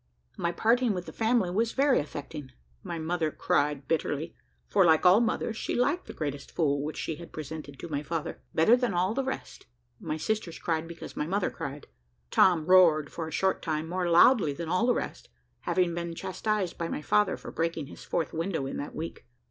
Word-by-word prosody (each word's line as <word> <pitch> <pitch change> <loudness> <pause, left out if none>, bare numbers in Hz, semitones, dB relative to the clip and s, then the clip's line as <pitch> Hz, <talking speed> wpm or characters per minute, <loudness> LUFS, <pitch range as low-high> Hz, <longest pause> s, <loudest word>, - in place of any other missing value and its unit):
My 170 - -1
parting 230 +5 +2
with 180 -1 -4
the - - -9
family 225 -5 +1
was 225 +5 0
very 275 -1 +4
affecting; 145 -1 -6 0.3
my 170 - -5
mother 165 0 -1
cried 145 -2 0
bitterly, 160 0 -1 0.3
for, 195 - +4
like 160 0 +4
all 180 +4 +8
mothers, 225 -1 -1
she - - -2
liked 275 +9 +1
the - - -7
greatest 145 -3 -4
fool 145 -4 +1
which 150 +2 -4
she 160 - -3
had 170 - -11
presented 155 -2 -7
to - - -7
my 145 -3 -2
father, 155 +1 -4
better 190 +9 +6
than 245 -6 -1
all 185 +4 +1
the 270 +3 -1
rest; 265 - -6 0.3
my 155 - -3
sisters 175 +1 -2
cried 165 -1 -1
because 170 0 -9
my 150 - -2
mother 195 +2 0
cried; 140 +1 -6 0.5
Tom 170 -4 +4
roared 165 -5 +5
for 165 -2 -4
a - - -7
short 190 +5 +1
time 155 -1 -2
more 180 +1 -1
loudly 170 - +6
than 165 +2 -5
all 185 +7 +2
the 245 - +4
rest, - - -5 0.3
having 180 -2 +1
been 170 0 -4
chastised 190 +1 -2
by 170 - -1
my 150 - -4
father 210 +4 +2
for - - -9
breaking 165 -2 -2
his 135 - -11
fourth 165 -3 -2
window 165 -3 -2
in 135 - -4
that 145 - -6
week. 165 +1 -6
170 Hz, 205 wpm, -28 LUFS, 155-190 Hz, 0.5 s, all